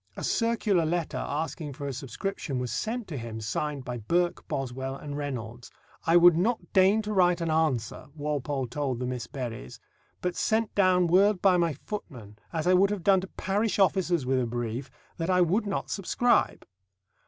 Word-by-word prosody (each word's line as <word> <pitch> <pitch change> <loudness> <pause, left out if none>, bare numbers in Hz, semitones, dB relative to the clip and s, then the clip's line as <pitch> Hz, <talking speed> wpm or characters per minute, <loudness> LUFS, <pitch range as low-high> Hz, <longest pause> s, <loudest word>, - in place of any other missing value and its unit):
A - - -5
circular 225 -6 +1
letter 165 0 -1
asking 150 0 -3
for 140 - -7
a 140 - -3
subscription 135 +2 -4
was 125 -1 -3
sent 235 0 -3
to 150 - -5
him, 115 -1 -6
signed 135 +6 -3
by 120 -1 -4
Burke, 175 +11 0
Boswell, 135 0 -3
and 145 +1 -7
Reynolds. 125 -5 -5 0.4
"I 165 +1 +6
would 175 -1 +7
not 220 +8 -1
deign 195 +3 +4
to 210 0 -3
write 180 -3 +3
an 165 -1 -1
answer," 150 -8 0
Walpole 145 -2 -2
told 130 +1 -2
the 125 - -3
Miss 125 -3 -4
Berrys, 120 - -6 0.4
"but 180 -1 -2
sent 220 0 0
down 185 -2 +4
word 190 +3 +4
by 185 -1 +4
my 170 -2 +1
footman, 120 - -7
as 160 -2 -2
I 180 - +4
would 190 +2 +5
have 205 -4 -3
done 190 0 +4
to 190 - -6
parish 200 +3 -1
officers 180 -6 +2
with 130 0 +1
a 125 - 0
brief, 120 +2 -4 0.3
that 165 +1 -2
I 180 -1 +4
would 190 +5 +2
not 195 - -3
subscribe." 240 +5 +1
165 Hz, 185 wpm, -28 LUFS, 130-190 Hz, 0.4 s, would